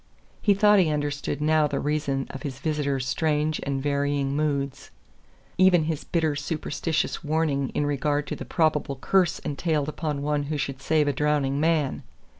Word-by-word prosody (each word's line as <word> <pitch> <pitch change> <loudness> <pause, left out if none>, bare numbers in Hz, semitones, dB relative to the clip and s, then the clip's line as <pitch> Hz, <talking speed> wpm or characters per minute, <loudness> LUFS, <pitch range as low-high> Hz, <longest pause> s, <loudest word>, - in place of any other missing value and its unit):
He 205 -2 +4
thought 210 0 +5
he 175 -4 +3
understood 145 -1 -2
now 155 0 +3
the 140 -1 -2
reason 145 -3 -1
of 135 - -8
his 135 -3 -5
visitor's 140 -3 -1
strange 150 +1 0
and 135 -1 -2
varying 140 -1 0
moods 140 -2 -2 0.7
even 185 -3 +5
his 155 -1 -2
bitter 160 -3 0
superstitious 155 +2 -2
warning 150 -3 0
in 145 - +1
regard 145 +1 0
to - - -4
the - - -7
probable 155 -4 0
curse 180 +6 +2
entailed 150 0 -1
upon 150 -1 -3
one 150 0 0
who 150 +1 -2
should 135 -1 -4
save 155 -1 +2
a 145 - +1
drowning 145 -1 +1
man. 155 -3 +1
150 Hz, 165 wpm, -25 LUFS, 140-155 Hz, 0.7 s, thought